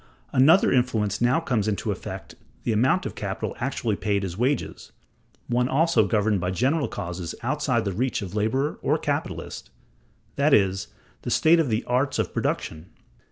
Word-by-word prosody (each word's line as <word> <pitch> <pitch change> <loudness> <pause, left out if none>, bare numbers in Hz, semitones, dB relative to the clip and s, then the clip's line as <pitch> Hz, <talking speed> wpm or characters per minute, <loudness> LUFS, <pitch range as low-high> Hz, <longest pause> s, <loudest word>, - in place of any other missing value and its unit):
Another 150 +9 +5
influence 110 -5 +1
now 125 +7 +3
comes 120 -10 -1
in 105 - +1
to - - -3
affect - - -7 0.3
the 115 - 0
amount 130 - +2
of - - -4
capital 100 0 -4
actually 120 -4 -1
paid 100 -1 -1
as 90 -2 -5
wages, 130 +7 -2 0.5
one 125 +1 0
also 165 +4 +3
governed 105 -3 +1
by 90 - -1
general 135 - +1
causes 85 0 -5
outside - - 0
the 100 - -1
reach 120 +2 -1
of 90 - -7
laborer 110 +8 0
or - - +2
capitalist, - - -4 0.7
that 140 +1 +5
is, 95 0 +1 0.3
the - - -5
state 165 +2 +4
of 155 -5 +1
the 110 +1 0
arts 130 +3 0
of - - -1
production. 80 +2 -2
115 Hz, 165 wpm, -25 LUFS, 100-135 Hz, 0.7 s, Another